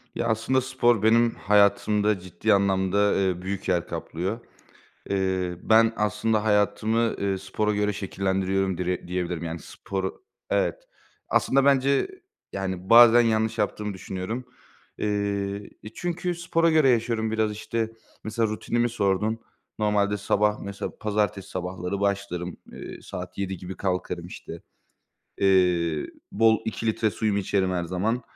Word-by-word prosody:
Ya, 115 Hz, -, -1 dB
aslında 115 Hz, +4 st, +1 dB
spor 120 Hz, -4 st, +2 dB
benim 115 Hz, +1 st, +4 dB
hayatımda 105 Hz, 0 st, +3 dB
ciddi 90 Hz, +5 st, 0 dB
anlamda, 100 Hz, +1 st, +2 dB
eee, 95 Hz, -2 st, 0 dB
büyük 95 Hz, +1 st, -4 dB
yer 90 Hz, -2 st, +1 dB
kaplıyor. 95 Hz, +8 st, -4 dB, 0.7 s
Eee, 95 Hz, -2 st, 0 dB
ben 115 Hz, +1 st, +4 dB
aslında 105 Hz, +1 st, +1 dB
hayatımı, 110 Hz, +2 st, +2 dB
eee, 100 Hz, -1 st, -1 dB
spora 100 Hz, +3 st, -1 dB
göre 105 Hz, 0 st, +1 dB
şekillendiriyorum 95 Hz, -1 st, -1 dB
dire 90 Hz, -1 st, -2 dB
diyebilirim, 90 Hz, -2 st, -3 dB
yani, 85 Hz, 0 st, -4 dB
spor 95 Hz, +4 st, -5 dB, 0.4 s
Evet. -, -, 0 dB, 0.4 s
Aslında 135 Hz, 0 st, +2 dB
bence, 140 Hz, -, +3 dB, 0.5 s
yani, 95 Hz, -1 st, -4 dB
bazen 120 Hz, 0 st, +9 dB
yanlış 110 Hz, -1 st, +1 dB
yaptığımı 105 Hz, -1 st, -1 dB
düşünüyorum, 95 Hz, +6 st, -5 dB, 0.5 s
eee 100 Hz, -1 st, -2 dB
E, 105 Hz, -, -7 dB
çünkü 175 Hz, 0 st, -2 dB
spora 165 Hz, 0 st, +1 dB
göre 155 Hz, -4 st, +5 dB
yaşıyorum 115 Hz, -2 st, +1 dB
biraz, 110 Hz, -1 st, +1 dB
işte, 110 Hz, +1 st, -3 dB, 0.3 s
mesela 110 Hz, +1 st, 0 dB
rutinimi 120 Hz, +3 st, -1 dB
sordun. 105 Hz, 0 st, 0 dB, 0.4 s
Normalde 105 Hz, -1 st, +1 dB
sabah 105 Hz, +1 st, +1 dB
mesela 100 Hz, 0 st, -5 dB
pazartesi 105 Hz, -2 st, -1 dB
sabahları 90 Hz, +1 st, -4 dB
başlarım, 100 Hz, -3 st, -2 dB
eee, -, -, -9 dB
saat -, -, -8 dB
07.00 95 Hz, -1 st, -3 dB
gibi 90 Hz, +2 st, -7 dB
kalkarım 90 Hz, -2 st, -2 dB
işte. -, -, -9 dB, 0.8 s
Eee, 90 Hz, -5 st, +2 dB, 0.3 s
bol 110 Hz, +1 st, +4 dB
2 110 Hz, +1 st, -4 dB
litre 110 Hz, 0 st, +1 dB
suyumu 105 Hz, 0 st, 0 dB
içerim 95 Hz, -1 st, 0 dB
her 90 Hz, -1 st, -1 dB
zaman. 100 Hz, +8 st, -1 dB
105 Hz, 130 wpm, -25 LUFS, 95-110 Hz, 0.8 s, bazen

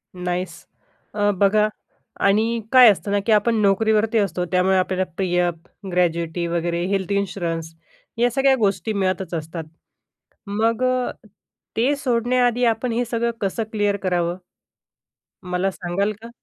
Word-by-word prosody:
Nice! 180 Hz, -1 st, -4 dB, 0.5 s
अ, 205 Hz, 0 st, +1 dB
बघा 210 Hz, +2 st, +3 dB, 0.6 s
आणि 225 Hz, +3 st, +2 dB
काय 255 Hz, -3 st, +9 dB
असतं 200 Hz, +1 st, -4 dB
ना 205 Hz, -, +2 dB
की 230 Hz, -, +1 dB
आपण 215 Hz, +2 st, +3 dB
नोकरीवरती 215 Hz, +2 st, +2 dB
असतो. 195 Hz, -4 st, 0 dB
त्यामुळे 185 Hz, +1 st, +3 dB
आपल्याला 185 Hz, 0 st, 0 dB
पी-एफ, 180 Hz, -2 st, +1 dB, 0.4 s
ग्रॅज्युएटी 170 Hz, -1 st, 0 dB
वगैरे 170 Hz, 0 st, -1 dB
हेल्थ 195 Hz, -1 st, -1 dB
इन्शुरन्स 175 Hz, -5 st, -2 dB, 0.4 s
या 240 Hz, +1 st, +3 dB
सगळ्या 270 Hz, +2 st, +3 dB
गोष्टी 215 Hz, +1 st, 0 dB
मिळतच 190 Hz, -3 st, -1 dB
असतात. 160 Hz, +1 st, -4 dB, 0.8 s
मग 225 Hz, +4 st, 0 dB
अ, 255 Hz, 0 st, +1 dB, 0.7 s
ते 260 Hz, +6 st, +2 dB
सोडण्याआधी 245 Hz, -2 st, +1 dB
आपण 230 Hz, +1 st, 0 dB
हे 240 Hz, +2 st, 0 dB
सगळं 235 Hz, 0 st, -1 dB
कसं 200 Hz, +3 st, -1 dB
क्लिअर 205 Hz, -2 st, 0 dB
करावं, 175 Hz, -1 st, 0 dB, 1.1 s
मला 180 Hz, +2 st, 0 dB
सांगाल 195 Hz, +3 st, -2 dB
का? 230 Hz, -, -8 dB
200 Hz, 130 wpm, -22 LUFS, 180-230 Hz, 1.1 s, काय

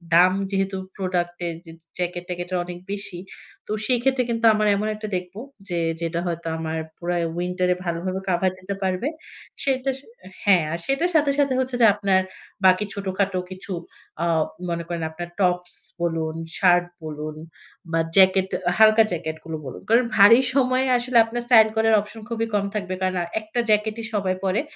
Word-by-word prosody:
দাম 180 Hz, +2 st, +6 dB, 0.2 s
যেহেতু 195 Hz, 0 st, -1 dB, 0.2 s
প্রোডাক্টের 175 Hz, -2 st, -2 dB
জ্যা 165 Hz, -, -11 dB, 0.2 s
জ্যাকেট 175 Hz, 0 st, -2 dB
ট্র্যাকেটের 180 Hz, +1 st, -3 dB
অনেক 175 Hz, 0 st, -7 dB
বেশি। 200 Hz, -3 st, -4 dB, 0.5 s
তো -, -, -6 dB
সেই 250 Hz, -2 st, +2 dB
ক্ষেত্রে 265 Hz, -1 st, +2 dB
কিন্তু 230 Hz, 0 st, 0 dB
আমার 215 Hz, 0 st, +1 dB
এমন 210 Hz, +2 st, -1 dB
একটা 215 Hz, 0 st, -6 dB
দেখব 180 Hz, +1 st, -5 dB, 0.3 s
যে, 175 Hz, -2 st, -2 dB, 0.2 s
যেটা 165 Hz, 0 st, -1 dB
হয়তো 170 Hz, -1 st, -4 dB
আমার 160 Hz, 0 st, -3 dB, 0.2 s
পুরা 175 Hz, 0 st, -2 dB, 0.2 s
উইন্টার 180 Hz, +1 st, -1 dB
এ -, -, -5 dB
ভালোভাবে 180 Hz, +3 st, -2 dB
কাভার 180 Hz, +1 st, +2 dB
দিতে 195 Hz, +2 st, -5 dB
পারবে। 185 Hz, +7 st, 0 dB, 0.6 s
সেইটাস 265 Hz, -1 st, 0 dB, 0.5 s
হ্যাঁ, 185 Hz, -5 st, +5 dB
আ -, -, 0 dB
সেটার 275 Hz, +7 st, +1 dB
সাথে, 290 Hz, -2 st, +4 dB
সাথে, 280 Hz, -2 st, +3 dB
হচ্ছে 255 Hz, -1 st, -1 dB
যে -, -, +8 dB
আপনার 195 Hz, -2 st, +2 dB, 0.4 s
বাকি 185 Hz, +2 st, +5 dB
ছোটখাটো 195 Hz, -1 st, -1 dB
কিছু 185 Hz, +1 st, -9 dB, 0.5 s
অ্যা 170 Hz, -, 0 dB, 0.4 s
মনে 170 Hz, 0 st, -2 dB
করেন 170 Hz, -2 st, -3 dB
আপনার 175 Hz, +2 st, -7 dB
টপস 180 Hz, -1 st, +1 dB, 0.3 s
বলুন, 165 Hz, -2 st, -1 dB, 0.2 s
শার্ট 175 Hz, -2 st, +4 dB, 0.2 s
বলুন 155 Hz, 0 st, -6 dB, 0.6 s
বা 165 Hz, -, +1 dB, 0.2 s
জ্যাকেট 190 Hz, 0 st, +5 dB, 0.3 s
হালকা 220 Hz, 0 st, +7 dB
জ্যাকেটগুলো 160 Hz, -1 st, -4 dB
বলুন। 130 Hz, -, -8 dB
কারণ 235 Hz, +2 st, +5 dB
ভারী 220 Hz, +5 st, +8 dB, 0.2 s
সময়ে 255 Hz, 0 st, +3 dB
আসলে 240 Hz, 0 st, 0 dB
আপনার 240 Hz, +1 st, -4 dB
স্টাইল 220 Hz, -3 st, +7 dB
করার 220 Hz, 0 st, +3 dB
অপশন 215 Hz, +2 st, -11 dB
খুবই 225 Hz, -1 st, -1 dB
কম 200 Hz, -1 st, +1 dB
থাকবে। 190 Hz, -3 st, -2 dB
কারণ 185 Hz, 0 st, 0 dB
আ -, -, -4 dB, 0.2 s
একটা 215 Hz, +3 st, -4 dB
জ্যাকেটই 215 Hz, +1 st, +1 dB
সবাই 190 Hz, -2 st, 0 dB
পড়ে। 190 Hz, +5 st, +1 dB
190 Hz, 165 wpm, -23 LUFS, 175-220 Hz, 0.6 s, যে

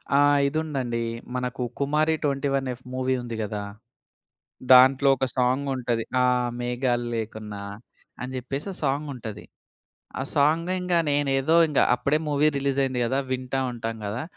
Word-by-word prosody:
ఆ! -, -, +6 dB, 0.3 s
ఇదుందండి. 135 Hz, -6 st, -2 dB, 0.3 s
మనకు 125 Hz, 0 st, -3 dB, 0.2 s
'కుమారి 150 Hz, +3 st, +2 dB
21 140 Hz, -1 st, 0 dB
F' 125 Hz, -, -14 dB
movie 130 Hz, 0 st, 0 dB
ఉంది 120 Hz, -2 st, -6 dB
కదా! 105 Hz, 0 st, -4 dB, 1.1 s
దాంట్లో 130 Hz, +2 st, +7 dB
ఒక 130 Hz, -, 0 dB
సాంగ్ 130 Hz, +3 st, +1 dB
ఉంటది. 120 Hz, -2 st, -1 dB, 0.2 s
ఆ! -, -, +4 dB, 0.4 s
'మేఘాలు 120 Hz, 0 st, -1 dB
లేకున్నా' 105 Hz, -2 st, -5 dB, 0.6 s
అని 130 Hz, +1 st, -5 dB
చెప్పేసి 135 Hz, +7 st, -4 dB
ఒ -, -, -7 dB
సాంగుంటది. 135 Hz, -7 st, -3 dB, 0.8 s
ఆ -, -, -1 dB
సాంగు 160 Hz, +5 st, +2 dB
ఇంగ 180 Hz, -1 st, -2 dB, 0.2 s
నేనేదో 140 Hz, +1 st, +1 dB
ఇంగ 145 Hz, -, +1 dB, 0.2 s
అప్పుడే 145 Hz, +4 st, +1 dB
మూవీ 145 Hz, +1 st, +3 dB
రిలీజ్ 140 Hz, 0 st, 0 dB
అయింది 130 Hz, -2 st, -1 dB
కదా! 135 Hz, +3 st, 0 dB
వింటా 130 Hz, +1 st, -2 dB
ఉంటాం 115 Hz, -1 st, -4 dB
కదా! 110 Hz, +7 st, -3 dB
130 Hz, 140 wpm, -25 LUFS, 120-140 Hz, 1.1 s, దాంట్లో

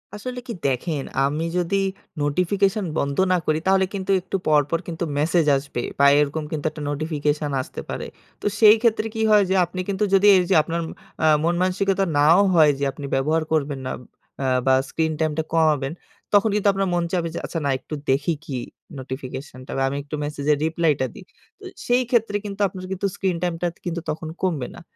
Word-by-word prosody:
আসলে 250 Hz, +4 st, -6 dB
কি 235 Hz, -, -4 dB
দেখেন, 140 Hz, +2 st, -1 dB, 0.2 s
আমি 150 Hz, +4 st, -1 dB
যদি 185 Hz, +3 st, +1 dB, 0.4 s
নোটিফিকেশন 190 Hz, +7 st, +1 dB
বন্ধ 140 Hz, 0 st, -1 dB
না 180 Hz, -, +4 dB
করি 155 Hz, 0 st, +1 dB
তাহলে 190 Hz, 0 st, +4 dB
কিন্তু 195 Hz, 0 st, -2 dB
একটু 185 Hz, -, -5 dB
পরপর 150 Hz, +2 st, +3 dB
কিন্তু 170 Hz, 0 st, -4 dB
মেসেজ 160 Hz, +2 st, +2 dB
আসবে। 135 Hz, -3 st, -5 dB, 0.2 s
বা 140 Hz, -, +6 dB
এরকম 150 Hz, +1 st, 0 dB
কিন্তু 155 Hz, -1 st, -4 dB
একটা 155 Hz, -, -9 dB
নোটিফিকেশন 150 Hz, 0 st, -1 dB
আসতে -, -, -8 dB
পারে। -, -, -4 dB, 0.4 s
তো -, -, -9 dB
সেই 215 Hz, -1 st, +8 dB
ক্ষেত্রে 225 Hz, -2 st, +2 dB
কি 220 Hz, -, -2 dB
হয়? 210 Hz, -1 st, +6 dB
যে 190 Hz, -, +2 dB
আপনি 180 Hz, +2 st, -8 dB
কিন্তু 200 Hz, +1 st, 0 dB
যদি 195 Hz, +1 st, +5 dB
এইযে 180 Hz, +1 st, +2 dB
আপনার 170 Hz, +2 st, -3 dB, 0.4 s
আ -, -, +5 dB, 0.2 s
মন-মানসিকতা 185 Hz, +3 st, +1 dB
নাও 155 Hz, +5 st, +6 dB, 0.2 s
হয় 155 Hz, -3 st, +6 dB
যে -, -, -2 dB
আপনি 140 Hz, +1 st, -8 dB
ব্যবহার 155 Hz, +4 st, +1 dB
করবেন 145 Hz, -3 st, 0 dB
না -, -, -3 dB, 0.5 s
আ -, -, +1 dB, 0.2 s
বা 130 Hz, -, +4 dB, 0.2 s
স্ক্রিন 160 Hz, -1 st, 0 dB
টাইমটা 155 Hz, 0 st, 0 dB
কমাবেন, 150 Hz, -4 st, +2 dB, 0.4 s
তখন 205 Hz, +2 st, +5 dB
কিন্তু 210 Hz, -1 st, +1 dB
আপনার 195 Hz, 0 st, 0 dB
মন 175 Hz, -, +1 dB
চাবে 175 Hz, -3 st, 0 dB
যে, -, -, -3 dB
"আচ্ছা 165 Hz, -, -3 dB
না, -, -, +1 dB
একটু 140 Hz, -, -10 dB, 0.2 s
দেখি 145 Hz, +5 st, +1 dB
কি 135 Hz, -5 st, -4 dB, 0.4 s
নোটিফিকেশনটা 130 Hz, 0 st, -7 dB
বা 135 Hz, -, +1 dB
আমি 140 Hz, -, -3 dB
একটু 145 Hz, +2 st, -6 dB
মেসেজের 145 Hz, 0 st, 0 dB
রিপ্লাইটা 160 Hz, -4 st, +1 dB
দিই।" 200 Hz, -, -11 dB, 0.3 s
তো -, -, -18 dB, 0.2 s
সেই 245 Hz, +1 st, +3 dB
ক্ষেত্রে 230 Hz, -4 st, +1 dB
কিন্তু 200 Hz, 0 st, -6 dB
আপনার 185 Hz, 0 st, -8 dB
কিন্তু 190 Hz, +1 st, -1 dB
স্ক্রিন 185 Hz, -3 st, -1 dB
টাইমটা 175 Hz, 0 st, -1 dB, 0.2 s
কিন্তু 170 Hz, -1 st, -3 dB
তখন 160 Hz, +1 st, -4 dB
কমবে 160 Hz, -9 st, -1 dB
না। -, -, -11 dB
165 Hz, 190 wpm, -23 LUFS, 145-190 Hz, 0.5 s, সেই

